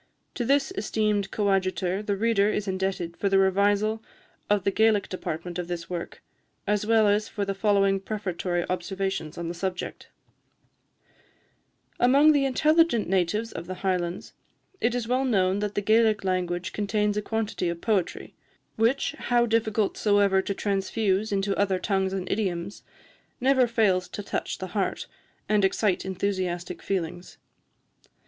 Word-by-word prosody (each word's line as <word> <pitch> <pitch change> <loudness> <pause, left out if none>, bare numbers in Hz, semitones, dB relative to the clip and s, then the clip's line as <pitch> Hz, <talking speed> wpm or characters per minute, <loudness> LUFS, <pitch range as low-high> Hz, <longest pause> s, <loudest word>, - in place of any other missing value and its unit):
To 245 - -2
this 280 +8 +2
esteemed 210 - 0
co 205 -2 0
adjutor 185 0 0
the 205 -1 -2
reader 215 -1 +2
is 210 -1 -2
indebted 190 -3 -2
for 200 - 0
the 195 - +3
revisal 205 +3 +2 0.5
of 205 -2 +2
the 200 - +1
Gaelic 220 -1 +3
department 175 -1 -5
of 175 - -4
this 175 0 -5
work, 170 -1 -6 0.4
as 210 +1 0
well 220 -1 +4
as 205 +1 +2
for 205 -2 -3
the 195 - -2
following 195 -1 +2
prefatory 185 -3 -3
observations 185 -3 -3
on 170 -1 -4
the 170 - -3
subject: 180 +1 -5 1.9
"Among 280 +5 +6
the 285 -2 +3
intelligent 305 - +3
natives 195 +5 0
of 170 - -7
the 185 - -5
Highlands, 180 -1 -2 0.5
it 235 +1 +1
is 240 -2 -2
well 255 +2 +1
known 195 -6 +2
that 205 0 -3
the 205 - +1
Gaelic 220 0 +3
language 180 -1 -2
contains 210 0 0
a 210 - 0
quantity 215 -5 -2
of 170 0 -4
poetry, 195 -3 -1 0.4
which, 230 +5 +2
how 240 -1 +1
difficult 220 -2 0
soever 200 -2 +3
to 200 +1 -3
transfuse 200 +1 0
into 195 0 0
other 195 -2 +2
tongues 190 0 0
and 190 -1 -3
idioms, 190 -2 -2 0.6
never 260 -1 +4
fails 200 -6 +2
to 205 - -7
touch - - -3
the 185 - -6
heart, 200 -2 -1 0.4
and 210 -1 +2
excite 195 0 +1
enthusiastic 185 -2 -3
feelings. 175 -2 -4
200 Hz, 150 wpm, -26 LUFS, 185-220 Hz, 1.9 s, Among